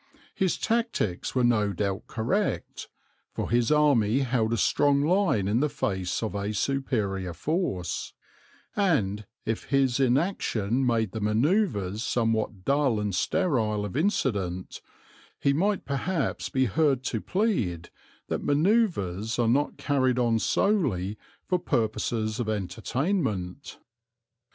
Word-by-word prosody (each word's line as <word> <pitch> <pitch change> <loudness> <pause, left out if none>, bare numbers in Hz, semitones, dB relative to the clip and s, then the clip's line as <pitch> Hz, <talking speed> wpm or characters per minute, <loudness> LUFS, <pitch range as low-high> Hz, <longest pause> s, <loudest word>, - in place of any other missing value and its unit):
His 190 -2 0
tactics 225 - -1
were 125 - +2
no 105 -4 +2
doubt 100 +2 -2
correct, 125 - -2 0.5
for - - -3
his 120 +2 +2
army 140 -6 +3
held 120 -4 0
a 115 - +1
strong 140 +7 +3
line 170 - +2
in 105 +4 +2
the 150 +2 +1
face 95 -5 -2
of 110 - -2
a 100 +1 -3
superior 105 -10 -1
force, 120 - -2 0.6
and, 105 - +1 0.2
if 115 0 -2
his 135 -2 +2
inaction 130 - +1
made 110 -4 +1
the 110 - -5
manoeuvres 110 - +1
somewhat 110 -6 -1
dull 140 -5 +2
and 105 -2 -2
sterile 110 - 0
of 105 - -7
incident, 100 - -1 0.6
he 140 - +2
might 195 +6 0
perhaps 145 +3 -2
be 130 0 +1
heard 135 +1 +1
to 115 -4 -2
plead 120 - -1 0.4
that - - -3
manoeuvres 145 - +1
are 120 -2 +2
not 140 +6 +1
carried 130 -3 +1
on 115 -2 +2
solely 110 - +1 0.3
for 180 -1 +1
purposes 110 -5 -1
of 115 -3 -2
entertainment. 110 - -2
120 Hz, 125 wpm, -27 LUFS, 105-145 Hz, 0.6 s, army